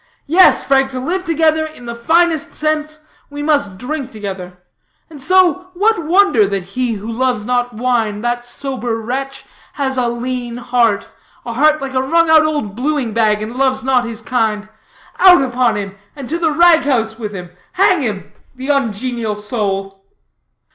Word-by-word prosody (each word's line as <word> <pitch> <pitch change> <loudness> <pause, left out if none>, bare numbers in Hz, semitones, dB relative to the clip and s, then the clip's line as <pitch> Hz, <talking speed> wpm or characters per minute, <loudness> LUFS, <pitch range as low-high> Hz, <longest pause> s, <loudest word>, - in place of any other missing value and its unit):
Yes, 360 +5 +5
Frank, 270 -1 +2
to 260 -1 -5
live 365 +8 -3
together 320 -1 +2
in 310 -6 -9
the 235 - -5
finest 320 +6 +1
sense, 305 0 -2 0.2
we 290 0 -6
must 285 -11 +1
drink 265 +3 -5
together. 190 -4 -7 0.5
And 290 -3 -10
so, 365 +3 +3
what 415 -1 +1
wonder 335 - +3
that 195 -2 -2
he 235 +6 -2
who 205 -1 -7
loves 245 -2 -1
not 245 0 -1
wine, 225 -3 -1
that 240 +1 -2
sober 245 -1 -4
wretch 270 +4 -5 0.3
has 265 -2 -2
a 245 - +1
lean 240 0 -4
heart 240 -4 0 0.4
a 235 - -4
heart 300 +3 +2
like 270 -1 -5
a 260 - +1
wrung 330 +4 +2
out 315 -1 +7
old 295 -10 -2
bluing 265 -2 -1
bag, 215 -1 +1
and 225 +3 -7
loves 265 0 0
not 255 -2 +2
his 230 -1 -6
kind? 220 -4 -1 0.5
Out 360 -6 +7
upon 250 -3 +1
him, 200 -1 -5 0.2
to 280 +5 -4
the 325 -2 +1
rag 335 +1 +5
house 230 -7 -1
with 210 -3 -5
him, 180 -3 -8 0.2
hang 375 -2 +3
him 210 -6 -4 0.2
the 260 +2 -7
ungenial 235 -4 -1
soul!" 195 -2 -4
255 Hz, 170 wpm, -16 LUFS, 225-305 Hz, 0.5 s, out